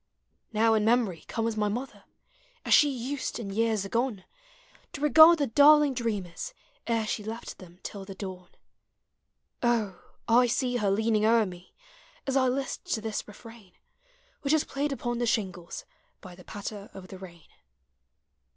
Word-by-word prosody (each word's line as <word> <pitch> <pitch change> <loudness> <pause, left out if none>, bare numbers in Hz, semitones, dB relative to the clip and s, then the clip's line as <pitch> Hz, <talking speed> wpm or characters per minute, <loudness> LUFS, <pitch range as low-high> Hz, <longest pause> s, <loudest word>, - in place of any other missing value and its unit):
Now 225 +1 +3
in 215 -1 +2
memory 220 -7 +1
comes 225 -1 -2
my 210 -1 0
mother, 245 +6 -5 0.6
As - - +3
she 295 - +7
used, 265 +1 -4
in 205 -4 -6
years 220 -1 0
agone, 230 -2 -2 0.7
To 280 - -7
regard 315 +3 +8
the 290 - +1
darling 290 +3 +6
dreamers 230 - -4 0.3
Ere 230 -2 +1
she 215 0 -3
left 225 +2 -7
them 180 -1 -14
till 200 -2 -7
the 195 0 -9
dawn: 185 -2 -8 1.1
O! 225 -6 0 0.3
I 245 +2 +5
see 250 0 0
her 210 -4 +1
leaning 215 +1 +1
o'er 225 0 +4
me. 180 -1 -11 0.5
As 270 - -1
I 260 -1 +4
list 265 +1 -2
to 220 - -5
this 220 -1 -4
refrain 215 -2 -14 0.7
Which 280 +1 +1
is 315 - +3
played 285 +1 -3
upon 240 -3 -3
the 240 - 0
shingles 185 -7 -3 0.4
U\ 180 -1 -10
the 180 - -16
patter 205 0 -7
of 185 -1 -10
the 190 - -9
rain. 170 -4 -12
225 Hz, 160 wpm, -28 LUFS, 195-250 Hz, 1.1 s, regard